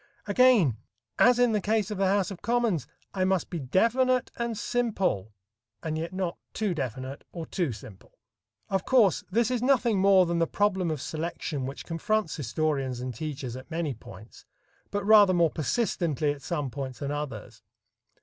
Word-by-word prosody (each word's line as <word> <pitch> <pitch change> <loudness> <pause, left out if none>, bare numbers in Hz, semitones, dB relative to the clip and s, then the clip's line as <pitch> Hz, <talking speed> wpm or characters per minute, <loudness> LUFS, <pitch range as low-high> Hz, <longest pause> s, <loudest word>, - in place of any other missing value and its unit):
Again, 205 - +4 0.4
as 245 -1 +6
in 245 -1 +4
the 210 -2 +1
case 215 0 0
of 205 - -4
the 195 - +3
House 200 0 +1
of 185 - -8
Commons, 230 - 0 0.3
I 190 - 0
must 190 -1 0
be 170 - -3
definite 235 - +2
and 235 -2 -3
simple, 200 - -1 0.5
and 155 -1 -2
yet 165 +2 -3
not 185 -2 -3
too 210 -4 -1
definite 130 -1 -5
or 170 -2 -6
too 170 -6 -1
simple. 105 -3 -12 0.5
Of 195 -1 -1
course, 230 -9 +3
this 230 +4 +1
is 245 -2 0
nothing 245 -5 +3
more 195 -1 +6
than 170 0 -1
the 165 - +2
problem 190 -3 +1
of 155 -3 -3
selection 155 -4 -4
which 135 - -7
confronts 205 +2 -1
historians 135 -1 -1
and 125 0 -4
teachers 130 -2 -5
at 130 +3 -10
many 165 -3 -2
points, 105 -1 -13 0.5
but 205 -1 -3
rather 205 -3 +7
more 170 -3 +3
persistently 155 - 0
at 145 -1 -7
some 145 -6 -3
points 130 -2 -5
than 140 -1 -4
others. 145 -1 -6
175 Hz, 170 wpm, -27 LUFS, 145-210 Hz, 0.5 s, rather